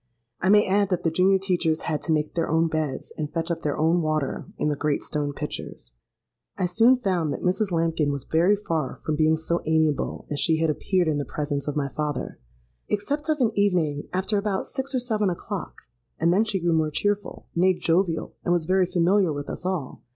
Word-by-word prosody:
I 190 Hz, -, +2 dB
may 210 Hz, +1 st, +6 dB
add 200 Hz, +1 st, +2 dB
that 180 Hz, -2 st, -1 dB
the 165 Hz, -, +1 dB
junior 185 Hz, +3 st, +4 dB
teachers 175 Hz, -4 st, 0 dB
had 155 Hz, -3 st, -2 dB
to -, -, -2 dB
make 150 Hz, -1 st, 0 dB
their 165 Hz, -, -1 dB
own 165 Hz, +1 st, +3 dB
beds, 155 Hz, -4 st, -3 dB
and 150 Hz, -1 st, -3 dB
fetch 165 Hz, +1 st, -2 dB
up 170 Hz, -, -2 dB
their 145 Hz, -, -1 dB
own 165 Hz, +3 st, +3 dB
water 155 Hz, -3 st, -1 dB
in -, -, 0 dB
the 150 Hz, -, +1 dB
great 145 Hz, 0 st, -1 dB
stone 145 Hz, -1 st, -2 dB
pitchers. 60 Hz, -, -6 dB, 0.6 s
"I 185 Hz, -, +1 dB
soon 225 Hz, +8 st, +5 dB
found 180 Hz, -, 0 dB
that -, -, -5 dB
Mrs. 190 Hz, +2 st, +1 dB
Lambkin 165 Hz, -3 st, +1 dB
was 140 Hz, -2 st, -3 dB
very 175 Hz, +6 st, +3 dB
far 165 Hz, -9 st, -3 dB
from 155 Hz, -, 0 dB
being 155 Hz, +1 st, +3 dB
so 170 Hz, +2 st, -1 dB
amiable 160 Hz, -2 st, +1 dB
as 145 Hz, -, -1 dB
she 160 Hz, +3 st, +3 dB
had 160 Hz, -1 st, +2 dB
appeared 180 Hz, +3 st, 0 dB
in 150 Hz, -2 st, +1 dB
the -, -, -1 dB
presence 145 Hz, -1 st, -3 dB
of 145 Hz, -, -2 dB
my 140 Hz, -2 st, 0 dB
father—except 145 Hz, -, -5 dB
of 305 Hz, -3 st, +1 dB
an 230 Hz, -3 st, +3 dB
evening, 175 Hz, -8 st, +1 dB
after 190 Hz, +3 st, 0 dB
about 200 Hz, -1 st, -1 dB
six 270 Hz, 0 st, -3 dB
or -, -, +2 dB
seven 215 Hz, -5 st, 0 dB
o'clock; 185 Hz, +1 st, -5 dB, 0.4 s
and 170 Hz, +2 st, +3 dB
then 210 Hz, +4 st, +3 dB
she 210 Hz, -3 st, -1 dB
grew 170 Hz, -1 st, +1 dB
more 160 Hz, -1 st, +2 dB
cheerful—nay, 185 Hz, 0 st, 0 dB
jovial, 165 Hz, -1 st, 0 dB
and -, -, 0 dB
was 175 Hz, -2 st, +2 dB
very 185 Hz, +1 st, +3 dB
familiar 180 Hz, +1 st, +2 dB
with 145 Hz, -1 st, -4 dB
us -, -, -7 dB
all. 175 Hz, -9 st, -3 dB
165 Hz, 210 wpm, -25 LUFS, 150-190 Hz, 0.6 s, may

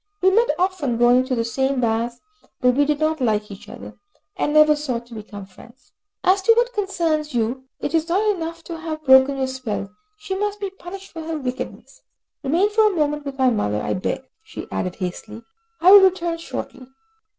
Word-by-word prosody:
We 380 Hz, 0 st, +4 dB
met 465 Hz, +5 st, +3 dB
often 355 Hz, -10 st, 0 dB
going 245 Hz, +2 st, +4 dB
to 260 Hz, -1 st, -1 dB
the 230 Hz, -1 st, -1 dB
same 265 Hz, +3 st, -1 dB
baths, 235 Hz, +1 st, -1 dB, 0.4 s
but 250 Hz, -1 st, +3 dB
we 285 Hz, +3 st, +3 dB
did 295 Hz, 0 st, 0 dB
not 310 Hz, -1 st, 0 dB
like 210 Hz, -3 st, 0 dB
each 195 Hz, -, -11 dB
other, -, -, -11 dB, 0.4 s
and 335 Hz, -, -1 dB
never 305 Hz, 0 st, +6 dB
sought 255 Hz, -6 st, -4 dB
to 240 Hz, -, -14 dB
become 205 Hz, -2 st, -9 dB
friends. 235 Hz, +6 st, -18 dB, 0.3 s
As 380 Hz, +2 st, +3 dB
to 455 Hz, +4 st, +5 dB
what 485 Hz, +1 st, +2 dB
concerns 330 Hz, -, -1 dB
you, 240 Hz, +3 st, -1 dB
it -, -, -4 dB
is 325 Hz, 0 st, +1 dB
not 395 Hz, +5 st, +1 dB
enough 330 Hz, -1 st, -6 dB
to 330 Hz, -1 st, -7 dB
have 315 Hz, -1 st, -5 dB
broken 265 Hz, +1 st, +6 dB
your 265 Hz, -, 0 dB
spell, 245 Hz, -7 st, -4 dB, 0.3 s
she 420 Hz, -2 st, -5 dB
must 415 Hz, +1 st, -2 dB
be 400 Hz, -2 st, -4 dB
punished 390 Hz, +1 st, -10 dB
for 325 Hz, -, -7 dB
her 320 Hz, 0 st, -4 dB
wickedness. 260 Hz, -2 st, -6 dB, 0.4 s
Remain 340 Hz, +9 st, +1 dB
for 430 Hz, 0 st, +4 dB
a -, -, -5 dB
moment 295 Hz, -2 st, -1 dB
with 275 Hz, -1 st, -6 dB
my 260 Hz, -2 st, +3 dB
mother, 105 Hz, -, -1 dB
I -, -, -2 dB
beg," 185 Hz, +7 st, -3 dB, 0.2 s
she 440 Hz, -, -9 dB
added 180 Hz, -1 st, -3 dB
hastily, 205 Hz, +4 st, -6 dB, 0.4 s
"I 365 Hz, +3 st, +7 dB
will 400 Hz, 0 st, +10 dB
return 350 Hz, -3 st, +2 dB
shortly." 260 Hz, -5 st, -7 dB
295 Hz, 200 wpm, -22 LUFS, 245-355 Hz, 0.4 s, will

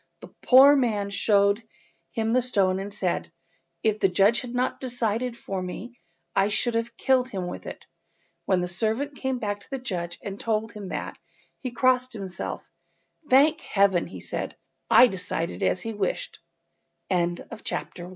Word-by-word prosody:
The -, -, -12 dB
poor 270 Hz, +3 st, +8 dB
man 215 Hz, -7 st, 0 dB
showed 200 Hz, +1 st, +3 dB, 0.5 s
him 225 Hz, 0 st, -1 dB
the 255 Hz, -, +4 dB
stone, 195 Hz, -6 st, +1 dB
and 200 Hz, +1 st, -5 dB
said— 190 Hz, -5 st, -2 dB, 0.5 s
"If 215 Hz, -1 st, +2 dB
the 195 Hz, -, +3 dB
judge 200 Hz, +6 st, +3 dB
had 250 Hz, -2 st, -7 dB
not 255 Hz, +1 st, 0 dB
decided 240 Hz, -1 st, -2 dB
for 195 Hz, -4 st, -4 dB
me 230 Hz, +7 st, -7 dB, 0.4 s
I 195 Hz, 0 st, +4 dB
should 210 Hz, +3 st, +1 dB
have 230 Hz, +1 st, -2 dB
killed 260 Hz, -1 st, +2 dB
him 190 Hz, -6 st, -4 dB
with 180 Hz, -, -7 dB
it." -, -, -8 dB, 0.6 s
When 185 Hz, -2 st, +3 dB
the 180 Hz, -, -1 dB
servant 225 Hz, +10 st, -1 dB
came 265 Hz, -2 st, -2 dB
back 205 Hz, -3 st, -3 dB
to 200 Hz, -, -17 dB
the 270 Hz, -, -3 dB
judge 175 Hz, -9 st, -4 dB
and 200 Hz, -1 st, -6 dB
told 220 Hz, -1 st, -1 dB
him 210 Hz, -3 st, -8 dB
that, -, -, -5 dB, 0.4 s
he 255 Hz, -, -4 dB
crossed 255 Hz, +1 st, +2 dB
himself— 190 Hz, -5 st, -5 dB, 0.6 s
"Thank 300 Hz, +5 st, +5 dB
Heaven," 195 Hz, -4 st, +2 dB
sai -, -, -4 dB
220 Hz, 140 wpm, -26 LUFS, 195-250 Hz, 0.6 s, poor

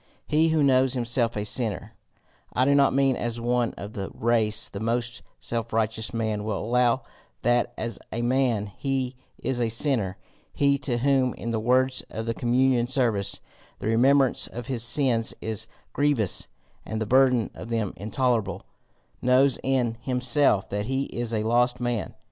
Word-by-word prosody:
He 155 Hz, +2 st, +2 dB
who 160 Hz, -2 st, +2 dB
knows 130 Hz, -1 st, +3 dB
himself 120 Hz, -2 st, 0 dB
a 105 Hz, -, -2 dB
sinner 110 Hz, -1 st, -1 dB, 0.6 s
I 130 Hz, -, +2 dB
do 140 Hz, -, +4 dB
not 140 Hz, -1 st, +4 dB
mean 135 Hz, -1 st, +2 dB
as 120 Hz, -1 st, -3 dB
one 120 Hz, 0 st, 0 dB
of 105 Hz, +2 st, -8 dB
the 95 Hz, -1 st, -5 dB
race 110 Hz, -2 st, +1 dB
the 100 Hz, -, -8 dB
most 120 Hz, +2 st, -2 dB, 0.2 s
self 115 Hz, -1 st, -4 dB
righteous 110 Hz, 0 st, 0 dB
man 110 Hz, -2 st, -2 dB
will 105 Hz, -2 st, -2 dB
allow 120 Hz, +3 st, +1 dB, 0.4 s
that 120 Hz, +1 st, +2 dB
as 115 Hz, -2 st, -4 dB
a 120 Hz, +1 st, -2 dB
man 120 Hz, -5 st, +1 dB
he 135 Hz, -2 st, -2 dB, 0.2 s
is 125 Hz, -1 st, -1 dB
a 115 Hz, -, +1 dB
sinner 110 Hz, -5 st, +1 dB, 0.4 s
he 140 Hz, -1 st, +2 dB
to 130 Hz, -4 st, -1 dB
whom, 130 Hz, 0 st, +2 dB
in 115 Hz, -, -5 dB
the 115 Hz, -, -1 dB
words 130 Hz, +3 st, +2 dB
of 110 Hz, +1 st, -5 dB
the 115 Hz, -, -1 dB
communion 120 Hz, 0 st, +2 dB
service, 120 Hz, -7 st, -1 dB, 0.4 s
the -, -, -8 dB
remembrance 130 Hz, +4 st, +3 dB
of 120 Hz, 0 st, -7 dB
his 125 Hz, -2 st, -2 dB
sins 120 Hz, -2 st, +3 dB
is 110 Hz, -2 st, -2 dB, 0.3 s
grievous, 145 Hz, -9 st, +1 dB, 0.4 s
and 110 Hz, -, -4 dB
the 110 Hz, -, -1 dB
burden 125 Hz, 0 st, +3 dB
of 115 Hz, -, -9 dB
them 115 Hz, -4 st, -1 dB
intolerable, 110 Hz, -1 st, -1 dB, 0.6 s
knows 130 Hz, +2 st, +3 dB
in 125 Hz, -4 st, 0 dB
himself 125 Hz, -3 st, +2 dB
that 105 Hz, +1 st, -2 dB
he 135 Hz, +1 st, 0 dB
is 120 Hz, -1 st, -3 dB
a 110 Hz, -2 st, -1 dB
lost 120 Hz, +2 st, +2 dB
man. 120 Hz, -4 st, -2 dB
120 Hz, 165 wpm, -25 LUFS, 110-130 Hz, 0.6 s, do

